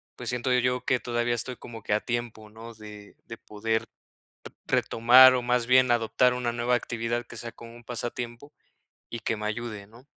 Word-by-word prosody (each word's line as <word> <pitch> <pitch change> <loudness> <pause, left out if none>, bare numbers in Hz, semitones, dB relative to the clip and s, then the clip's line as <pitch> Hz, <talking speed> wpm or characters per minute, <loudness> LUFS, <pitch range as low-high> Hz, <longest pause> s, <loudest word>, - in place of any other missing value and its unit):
pues, - - -6
siento 125 +1 -1
yo 125 0 0
que 125 - +1
todavía 120 0 -1
estoy 125 +2 -4
como 115 -1 -10
que 105 - -1
a 105 - +2
tiempo, 120 -3 -5
¿no? 115 +2 -11
De 105 -1 -12
de 115 - -9
poder 110 +1 -2 0.8
re - - +2
retomar, 130 +3 +7
o 125 - 0
más 125 -1 0
bien 130 0 +5
adoptar 120 +2 +2
una 125 -1 -2
nueva 120 +1 +1
actividad 120 0 -3
que 115 - -11
sea 115 0 -7
como 115 0 -13
un 120 - -16
pasatiempo 120 +3 -5 0.6
y 115 - -5
que 110 0 -2
me 105 - -5
ayude, 110 -2 -5
¿no? 115 +4 -18
120 Hz, 195 wpm, -26 LUFS, 115-125 Hz, 0.8 s, retomar